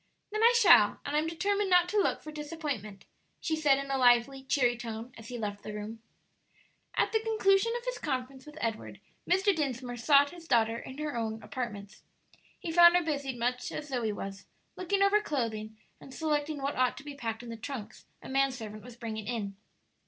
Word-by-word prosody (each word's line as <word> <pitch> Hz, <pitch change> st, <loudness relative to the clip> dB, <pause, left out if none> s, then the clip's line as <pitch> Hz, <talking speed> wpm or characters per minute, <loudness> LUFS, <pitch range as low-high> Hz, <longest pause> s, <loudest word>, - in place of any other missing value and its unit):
"Then 430 Hz, +1 st, -1 dB
I 465 Hz, +1 st, +7 dB
shall; 285 Hz, -, +6 dB
and 285 Hz, -, -2 dB
I'm 305 Hz, +1 st, +2 dB
determined 400 Hz, +4 st, 0 dB
not 355 Hz, -1 st, +5 dB
to 420 Hz, -, -1 dB
look -, -, 0 dB
for 310 Hz, -, -7 dB
disappointment," 295 Hz, -, -5 dB, 0.3 s
she 320 Hz, -, -1 dB
said, 295 Hz, -3 st, +3 dB
in 275 Hz, 0 st, -4 dB
a 270 Hz, -, 0 dB
lively, 245 Hz, +2 st, +4 dB
cheery 255 Hz, -3 st, +2 dB
tone, 230 Hz, +1 st, -7 dB
as 225 Hz, -1 st, -11 dB
he 245 Hz, -, -6 dB
left 205 Hz, -2 st, -4 dB
the 210 Hz, -, -7 dB
room, 215 Hz, +2 st, -7 dB, 0.9 s
At -, -, +2 dB
the 445 Hz, -, +2 dB
conclusion 435 Hz, -1 st, +2 dB
of 480 Hz, -, -9 dB
his -, -, -3 dB
conference 265 Hz, 0 st, -4 dB
with 300 Hz, +1 st, -11 dB
Edward, 225 Hz, -2 st, -3 dB, 0.3 s
Mr. 380 Hz, +2 st, +3 dB
Dinsmore 255 Hz, -5 st, -3 dB
sought 285 Hz, +3 st, +5 dB
his 340 Hz, -2 st, -12 dB
daughter 230 Hz, -3 st, +2 dB
in 260 Hz, +2 st, -9 dB
her 300 Hz, -2 st, -3 dB
own 220 Hz, -1 st, -3 dB
apartments. 210 Hz, -5 st, -6 dB, 0.6 s
He 330 Hz, -, -5 dB
found 345 Hz, +1 st, +8 dB
her 355 Hz, -, +1 dB
busied 280 Hz, -5 st, -2 dB
much 245 Hz, +1 st, -1 dB
as 300 Hz, -1 st, -6 dB
Zoe 240 Hz, -5 st, -1 dB
was, 195 Hz, -1 st, -7 dB, 0.3 s
looking 390 Hz, +2 st, +1 dB
over 410 Hz, +1 st, +4 dB
clothing 220 Hz, -, -3 dB, 0.2 s
and -, -, -13 dB
selecting 300 Hz, -1 st, -1 dB
what 280 Hz, +1 st, -1 dB
ought 255 Hz, -1 st, +1 dB
to -, -, -9 dB
be 290 Hz, 0 st, -7 dB
packed 230 Hz, -4 st, -5 dB
in 240 Hz, -, -9 dB
the 230 Hz, -, -5 dB
trunks 225 Hz, -2 st, -8 dB, 0.2 s
a -, -, -8 dB
man 270 Hz, 0 st, +2 dB
servant 215 Hz, -4 st, -8 dB
was 240 Hz, -1 st, -12 dB
bringing 220 Hz, -3 st, -5 dB
in. 210 Hz, -5 st, -3 dB
270 Hz, 200 wpm, -30 LUFS, 230-315 Hz, 0.9 s, found